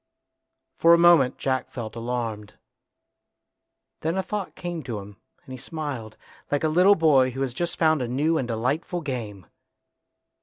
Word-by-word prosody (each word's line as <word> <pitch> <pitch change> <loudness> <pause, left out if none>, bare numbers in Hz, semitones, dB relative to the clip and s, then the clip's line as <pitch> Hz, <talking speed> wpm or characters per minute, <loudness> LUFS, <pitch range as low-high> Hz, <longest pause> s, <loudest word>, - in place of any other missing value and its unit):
For 170 +1 +7
a - - +2
moment 170 -7 +5
Jack 130 -1 -1
felt 115 -3 -7
alarmed. 115 -3 -4 1.4
Then 165 +4 -2
a 190 - 0
thought 205 -2 -5
came 175 -2 -5
to 120 -7 -5
him 100 0 -10 0.3
and - - -12
he 130 - -8
smiled, 135 -7 -6 0.3
like 145 +1 0
a 155 - +2
little 180 +6 +5
boy 145 -6 +4
who 130 +2 -6
has 130 -3 -1
just 170 +6 -3
found 155 -3 +3
a 125 - -2
new 150 +6 +1
and 125 - -3
delightful 130 +10 -2
game. 115 - -5
135 Hz, 160 wpm, -25 LUFS, 120-165 Hz, 1.4 s, For